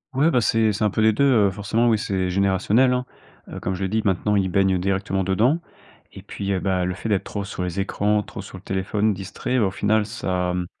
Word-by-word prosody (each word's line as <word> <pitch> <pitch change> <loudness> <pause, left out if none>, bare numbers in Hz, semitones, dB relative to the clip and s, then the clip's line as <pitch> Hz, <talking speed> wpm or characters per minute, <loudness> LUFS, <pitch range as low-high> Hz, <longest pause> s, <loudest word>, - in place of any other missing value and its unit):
Ouais, 155 +5 +3
bah, 125 - +3
c'est 110 0 +2
c'est 105 - -2
un 105 - +3
peu 110 - -1
les 110 0 +4
2, 125 - +1
heu, 110 -8 +4
forcément 110 +4 0
oui, 110 -2 +3
c'est 95 -3 -1
générationnel, 100 +7 +2
hein. 125 0 -1 0.4
Heu, - - -7
comme 95 - -2
je 95 - -4
le 95 - -1
dis, 110 +3 0
maintenant, 105 +1 +1
ils 95 -2 +1
baignent 95 0 +2
directement 95 +1 -1
dedans. 110 - +2 0.5
Et - - -11
puis, 100 0 -5
heu, 95 - 0
bah, 95 -1 0
le 90 0 -2
fait 110 +4 -5
d'être 100 -2 0
trop 100 -1 -4
sur 95 -1 -6
les 90 +1 -3
écrans, 105 +2 0
trop - - -8
sur 95 -1 -10
le 90 - -15
téléphone, 100 +3 0
distrait, 100 +6 -3
au 100 - +2
final 105 +2 +1
ça, 90 -5 -2
mmh, 90 -1 -2
100 Hz, 245 wpm, -23 LUFS, 95-110 Hz, 0.5 s, les